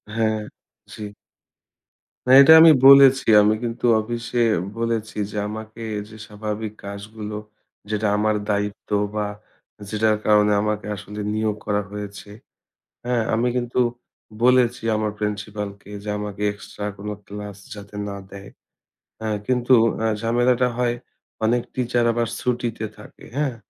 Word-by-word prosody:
হ্যাঁ, 110 -1 +1 0.5
জি। 105 -1 -6 1.2
না, - - +3
এটা 140 +4 +9
আমি 165 0 +9 0.2
বলেছি। 135 -1 +8
আমি 105 +1 +3
কিন্তু 115 0 -3
অফিসে 120 +2 -3 0.4
বলেছি 115 -2 -2
যে 105 - -6
আমাকে 110 +1 -8 0.3
যে 110 - -12
স্বাভাবিক 105 0 -5
কাজগুলো, 105 +1 -7 0.5
যেটা 105 0 0
আমার 110 +1 +1
দায়িত্ব 105 0 -2 0.3
বা 105 -1 0 0.6
যেটার 110 0 +1
কারণে 105 0 +4
আমাকে 105 0 -2
আসলে 105 +1 -8
নিয়োগ 110 -1 0
করা 105 0 0
হয়েছে, 105 0 -8 0.8
হ্যাঁ? 120 -2 +1
আমি 115 +3 +1
কিন্তু 125 0 -1 0.6
বলেছি 125 -1 +3
আমার 105 0 -1
প্রিন্সিপাল 105 0 -3
কে 105 - -14
যে, 105 - -5
আমাকে 105 -1 -6
এক্সট্রা 105 0 -8
কোনো 105 +1 -5
ক্লাস 105 -1 -8 0.2
যাতে 100 0 -11
না 100 - -5 0.2
দেয়, 100 0 -10 0.7
হ্যাঁ? 110 -1 -2
কিন্তু 125 0 +2 0.2
অ্যা 110 0 0
ঝামেলাটা 120 +2 +2
হয় 120 -1 +1 0.5
অনেক 120 +2 +2
টিচার 120 -1 0
আবার 120 0 0
ছুটিতে 120 -3 -2
থাকে, 105 - -14
হ্যাঁ? 145 -4 0
110 Hz, 130 wpm, -22 LUFS, 105-120 Hz, 1.2 s, এটা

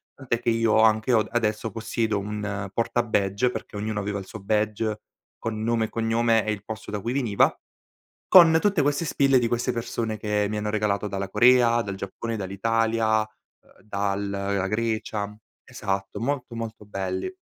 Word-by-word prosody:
tantè 125 -4 -2
che - - -1
io 115 -1 +3
anche 110 +2 +4
ho 115 - +5
adesso 115 -1 -1
possiedo 110 0 -1
un 105 -1 -4
porta 120 +2 0
badge, 105 +2 +1
perché - - -7
ognuno 105 +1 -2
aveva 100 0 -2
il 95 - -6
suo 110 - -9
badge 105 +1 -1 0.4
con 110 -1 -4
nome 115 0 +1
e - - -7
cognome 115 0 +1
e 110 - 0
il 100 - -8
posto 110 -2 -7
da 105 -1 -3
cui 115 - -2
veniva, 120 -6 +2 0.7
con 165 -3 +8
tutte 200 -4 +2
queste 145 +3 +1
spille 135 -3 +3
di 120 - +1
queste 120 +2 0
persone 115 -2 -3
che 105 0 0
mi 105 - -2
hanno 105 0 -2
regalato 105 -1 0
dalla 100 -1 -4
Corea, 120 +1 +5
dal 100 -3 -5
Giappone, 100 +4 -5
dall'Italia, 110 +2 +1
uhm, 110 0 -14
dal 100 -1 -2
la 100 -1 -1
Grecia. 110 -1 -2 0.3
Esatto, 95 0 -4
molto 125 0 -2
molto 115 -2 -6
belli. 95 - -4
110 Hz, 170 wpm, -25 LUFS, 100-115 Hz, 0.7 s, con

